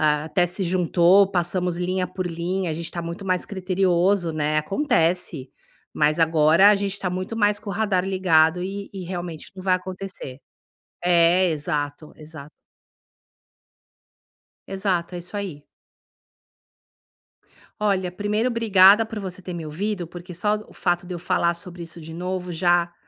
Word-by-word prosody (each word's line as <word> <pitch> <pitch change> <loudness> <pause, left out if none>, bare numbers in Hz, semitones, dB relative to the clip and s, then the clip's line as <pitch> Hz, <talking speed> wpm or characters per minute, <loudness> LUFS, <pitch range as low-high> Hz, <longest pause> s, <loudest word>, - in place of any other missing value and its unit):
até 155 +4 +2
se 185 +3 -4
juntou, 180 +2 +4
passamos 180 -1 0
linha 180 +1 -1
por 185 +1 -5
linha, 175 +1 -2
a - - -1
gente 165 +2 -5
está 170 0 -5
muito 170 +4 -6
mais 185 -1 0
criterioso, 185 -2 +1
né, 155 0 0
acontece, 165 - 0 0.4
mas 150 +1 +2
agora 160 +4 +5
a - - +5
gente 200 -1 -2
está 190 -2 -3
muito 185 +5 -4
mais 205 -1 +2
com 205 - -11
o - - -2
radar 200 -3 0
ligado 180 -2 +3
e 200 +1 -5
e 190 - -5
realmente 175 -3 -6
não 185 - -9
vai 185 -1 +3
acontecer. 185 -7 -6 0.7
É, 175 +1 +4
exato 145 0 -3
exato. 155 -1 -11 2.2
Exato, 190 -3 -2
é - - -4
isso 180 +4 -8
aí. 175 -8 -5 2.2
Olha, 190 -4 +1
primeiro 210 +5 0
obrigada 215 -2 +5
por 220 -1 -6
você 190 -2 -7
ter 180 -1 -7
me 165 -2 -5
ouvido, 180 +4 -3
porque 175 +1 -10
só 210 +4 +1
o - - -16
fato 175 0 -1
de 180 - -5
eu - - -5
falar 175 -1 +1
sobre 175 0 -9
isso 165 0 -9
de 160 0 -10
novo 180 +1 -4
já 175 0 +2
180 Hz, 155 wpm, -23 LUFS, 170-195 Hz, 2.2 s, agora